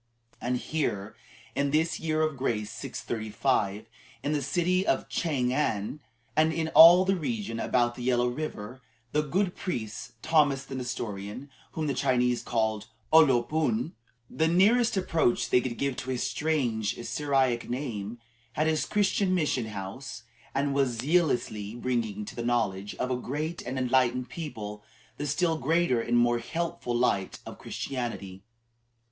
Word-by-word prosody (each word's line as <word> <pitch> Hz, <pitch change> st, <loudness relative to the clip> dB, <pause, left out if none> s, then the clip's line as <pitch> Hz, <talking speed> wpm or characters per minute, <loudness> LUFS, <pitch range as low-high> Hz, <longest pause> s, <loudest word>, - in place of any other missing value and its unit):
And 125 Hz, +1 st, 0 dB
here, 110 Hz, -9 st, -2 dB, 0.4 s
in 140 Hz, 0 st, 0 dB
this 160 Hz, +3 st, +1 dB
year 155 Hz, -1 st, 0 dB
of 155 Hz, -2 st, 0 dB
grace 115 Hz, -5 st, -2 dB
635, 110 Hz, -2 st, -2 dB, 0.4 s
in 145 Hz, -, 0 dB
the 150 Hz, -1 st, 0 dB
city 180 Hz, +6 st, +1 dB
of 135 Hz, -, 0 dB
Chang 130 Hz, -7 st, 0 dB
an, 120 Hz, -2 st, -1 dB, 0.4 s
and 155 Hz, +1 st, +4 dB
in 160 Hz, 0 st, -1 dB
all 175 Hz, +4 st, +9 dB
the 195 Hz, +1 st, +2 dB
region 115 Hz, -, -3 dB
about 120 Hz, 0 st, +1 dB
the 125 Hz, -, -9 dB
Yellow 120 Hz, 0 st, +2 dB
River, 125 Hz, -3 st, -5 dB, 0.3 s
the 150 Hz, -, +2 dB
good 180 Hz, +5 st, 0 dB
priest 120 Hz, -, -5 dB
Thomas 145 Hz, -4 st, +3 dB
the 135 Hz, -, -8 dB
Nestorian, 120 Hz, -1 st, -5 dB, 0.2 s
whom 160 Hz, -, -2 dB
the 140 Hz, -, 0 dB
Chinese 125 Hz, -3 st, +1 dB
called 110 Hz, -2 st, -1 dB, 0.3 s
O 160 Hz, -, +10 dB
lo 130 Hz, -6 st, +5 dB
pun 160 Hz, -, 0 dB, 0.3 s
the 160 Hz, +5 st, 0 dB
nearest 205 Hz, +7 st, +4 dB
approach 165 Hz, -9 st, +1 dB
they 125 Hz, -, +5 dB
could 120 Hz, -2 st, -4 dB
give 140 Hz, -2 st, -1 dB
to 130 Hz, -, -5 dB
his 125 Hz, -2 st, -1 dB
strange 120 Hz, -5 st, 0 dB
Syriac 130 Hz, -1 st, +1 dB
name 120 Hz, -4 st, -4 dB, 0.4 s
had 155 Hz, -, +1 dB
his 160 Hz, -1 st, +1 dB
Christian 200 Hz, -2 st, +2 dB
mission 150 Hz, -8 st, 0 dB
house, 105 Hz, +4 st, -7 dB, 0.3 s
and 140 Hz, +1 st, +1 dB
was 135 Hz, -4 st, +1 dB
zealously 120 Hz, -, 0 dB
bringing 115 Hz, -4 st, -2 dB
to -, -, -9 dB
the 120 Hz, -, -4 dB
knowledge 105 Hz, -5 st, -1 dB
of 130 Hz, -, -2 dB
a -, -, +2 dB
great 150 Hz, +7 st, -3 dB
and 130 Hz, +2 st, -5 dB
enlightened 125 Hz, -1 st, +2 dB
people 110 Hz, -10 st, -6 dB, 0.3 s
the 145 Hz, -, -3 dB
still 160 Hz, +2 st, +1 dB
greater 160 Hz, -8 st, +2 dB
and 120 Hz, +1 st, +1 dB
more 120 Hz, 0 st, +3 dB
helpful 160 Hz, -2 st, -3 dB
light 100 Hz, -6 st, +1 dB
of -, -, -9 dB
Christianity. 115 Hz, -7 st, -5 dB
130 Hz, 155 wpm, -28 LUFS, 120-155 Hz, 0.4 s, O